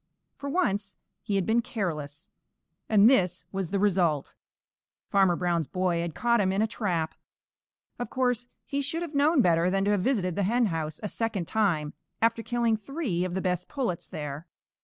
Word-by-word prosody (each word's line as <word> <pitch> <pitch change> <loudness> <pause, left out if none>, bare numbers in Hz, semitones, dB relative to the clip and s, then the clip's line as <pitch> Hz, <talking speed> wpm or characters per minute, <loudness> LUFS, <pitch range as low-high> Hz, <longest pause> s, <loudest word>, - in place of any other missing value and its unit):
For 280 - -6
once 205 - 0 0.2
he 205 -3 -2
had 195 -2 +1
been 230 +2 +3
careless, 155 -10 -4 0.6
and 215 -1 +6
this 185 -8 +3
was 190 -3 -3
the 200 - 0
result. 180 -7 +1 0.8
Farmer 190 -3 +4
Brown's 170 -3 0
boy 180 +1 0
had 170 -2 -4
caught 235 -2 +2
him 190 -1 +2
in 195 - 0
a 220 - +4
trap. 180 -8 -2 0.9
Of 245 - -3
course, 245 -2 0 0.2
he 280 0 -2
should 320 +5 -2
have 325 -3 -6
known 290 -1 +4
better 170 0 +3
than 195 +1 +1
to 205 - +2
have 205 -2 +2
visited 185 -7 0
the 205 - 0
henhouse 180 -8 0
a - - -1
second 210 -5 -2
time 175 -9 +1 0.3
after 230 0 +2
killing 235 -1 +1
three 220 - -2
of 185 -1 -3
the 190 - -1
best 180 -1 -1
pullets 245 - -3
there. 150 -1 -6
195 Hz, 180 wpm, -28 LUFS, 175-235 Hz, 0.9 s, and